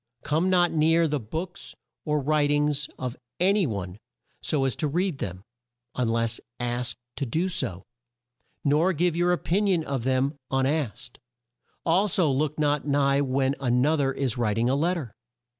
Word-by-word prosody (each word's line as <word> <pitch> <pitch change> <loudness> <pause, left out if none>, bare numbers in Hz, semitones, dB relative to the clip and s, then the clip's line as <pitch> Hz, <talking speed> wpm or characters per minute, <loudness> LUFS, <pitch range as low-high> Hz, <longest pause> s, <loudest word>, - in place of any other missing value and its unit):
Come 160 +5 +1
not 175 -1 +4
near 165 +1 +3
the 150 -1 -1
books 160 - -6 0.3
or 150 -1 +1
wri 150 +1 +2
tings 145 0 +1
of 125 -2 -4 0.2
a 185 +3 +4
ny 200 -5 +2
one 100 -3 -5 0.4
so 140 -3 +1
as 130 - 0
to 155 - 0
read 175 0 -1
them, 90 0 -5 0.5
un 125 -3 0
less 115 0 0 0.2
asked 120 +1 -2 0.2
to 140 - -1
do 165 +10 0
so, 130 - -3 0.8
nor 155 +6 +3
give 170 +1 +1
your 175 +1 +2
o 180 - +2
pin 200 +6 0
ion 180 -5 +2
of 135 -5 -3
them 130 +3 0
un 135 0 +1
asked; 135 -5 -2 0.7
al 180 +5 +3
so 185 -7 +2
look 150 +3 0
not 150 -1 +1
nigh 140 -1 +3
when 135 0 +1
an 125 -1 +2
o 155 +2 +3
ther 140 -3 +1
is 130 -3 -2
wri 110 -4 +1
ting 115 +2 +1
a - - +2
let 170 +6 +1
ter. 130 -11 -6
145 Hz, 185 wpm, -26 LUFS, 130-165 Hz, 0.8 s, not